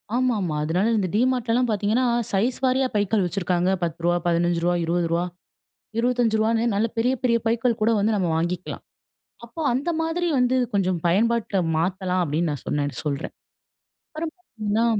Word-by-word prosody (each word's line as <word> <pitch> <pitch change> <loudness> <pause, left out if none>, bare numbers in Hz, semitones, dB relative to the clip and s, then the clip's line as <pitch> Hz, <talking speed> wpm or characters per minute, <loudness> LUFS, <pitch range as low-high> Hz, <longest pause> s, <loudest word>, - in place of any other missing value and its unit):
ஆமாமா. 220 -10 0
அதனால 175 +7 +1
இந்த 195 -3 0
டிமார்ட்லலாம் 245 0 +1
பாத்தீங்கன்னா, 215 +4 +1 0.3
சைஸ் 225 +6 +1
வாரியா 260 +1 +2
பைக்கள் 205 0 +2
வச்சிருக்காங்க. 180 -1 0
ரூ.10 170 +1 0
ரூ.15, 175 0 +1
ரூ.20, 170 0 0 0.7
ரூ.25 230 -2 +2
நல்ல 210 +3 +2
பெரிய, 245 +3 +2
பெரிய 240 -2 +3
பைகள் 230 +1 +1
கூட 220 - +4
வந்து 215 +2 +2
நம்ம 180 -4 0
வாங்கிக்கலாம். 175 +2 -3 0.6
அப்ப 240 +8 -6
அந்த 275 +7 -1
மாதிரி 330 +2 -1
வந்து 250 +1 +2 0.2
கொஞ்சம் 185 -3 +1
பயன்பாட்ல 220 +3 +1 0.2
மாத்தலாம் 185 +2 0
அப்பிடின்னு 160 +1 0
நான் 145 -4 -6
சொன்னேன்னு 145 -1 -1
சொல்றன். 140 -2 -3 0.8
அப்பறம் 315 0 -5
பாத்தீங்கன்னா 225 - -2
210 Hz, 135 wpm, -24 LUFS, 175-240 Hz, 0.8 s, கூட